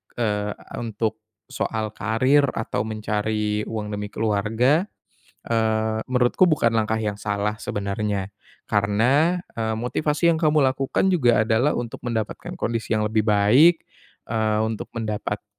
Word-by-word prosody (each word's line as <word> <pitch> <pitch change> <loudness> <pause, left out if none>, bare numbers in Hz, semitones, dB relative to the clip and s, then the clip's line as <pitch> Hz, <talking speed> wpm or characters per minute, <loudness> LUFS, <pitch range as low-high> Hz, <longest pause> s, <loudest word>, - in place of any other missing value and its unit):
eee, 105 -3 -1 0.3
untuk 110 -1 -2 0.3
soal 110 -1 -2
karir 130 +8 +2
atau 110 -1 -2
mencari 105 0 -2
uang 110 -2 -4
demi 105 0 -4
keluarga, 115 - +1 0.6
eee, 110 -1 0
menurutku 125 +8 +3
bukan 120 -7 +2
langkah 110 0 +1
yang 105 -2 -3
salah 105 +1 -1
sebenarnya 100 -1 -3 0.3
karena, 120 - +2
eee, 110 -1 -2
motivasi 150 +7 +1
yang 160 - -2
kamu 155 -3 +3
lakukan 135 +7 +1
juga 120 -9 +3
adalah 115 +6 +2
untuk 120 -1 -5
mendapatkan 115 -3 -4
kondisi 115 -1 -1
yang 105 - 0
lebih 110 0 +1
baik, 120 +12 +5 0.4
eee, 110 -1 0
untuk 110 -1 -4
mendapatkan, 105 -2 -3
110 Hz, 125 wpm, -23 LUFS, 105-125 Hz, 0.6 s, baik